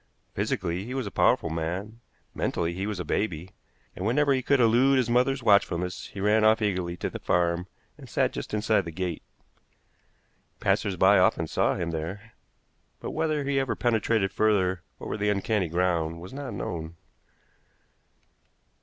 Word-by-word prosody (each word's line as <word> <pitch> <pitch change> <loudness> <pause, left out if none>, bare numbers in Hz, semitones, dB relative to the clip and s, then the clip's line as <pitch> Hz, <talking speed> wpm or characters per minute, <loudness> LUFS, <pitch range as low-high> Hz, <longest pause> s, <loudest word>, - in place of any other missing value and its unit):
Physically 90 +1 -2
he 125 +5 -6
was 130 -3 -2
a 100 - -5
powerful 80 - +2
man, 90 +8 -4 0.3
mentally 85 0 -1
he 95 +3 -3
was 105 -3 -3
a 90 - -4
baby; 90 0 -2 0.4
and 90 - -6
whenever 140 +6 +3
he 130 - +1
could 140 +2 +2
elude 125 +4 +4
his 125 -2 +1
mother's 125 +2 +2
watchfulness 90 -4 +2
he 100 - -10
ran 105 +2 +3
off 110 +1 +5
eagerly 90 -5 -1
to - - -2
the - - -6
farm 85 +1 0 0.3
and - - -12
sat - - +1
just - - -6
inside 110 +1 +2
the 85 - -5
gate. 90 -1 -3 1.4
Passers - - +1
by - - +5
often - - +3
saw - - +1
him 85 -1 -3
there, 95 +8 -6 0.7
but - - -5
whether 155 -2 0
he 140 0 +1
ever 130 -4 -1
penetrated 110 -4 +1
further 95 -5 +1 0.2
over - - -4
the 105 0 0
uncanny 105 -1 0
ground 85 -1 0
was 90 +6 -10
not 140 -6 -6
known. 85 -3 -5
100 Hz, 165 wpm, -27 LUFS, 90-115 Hz, 1.4 s, off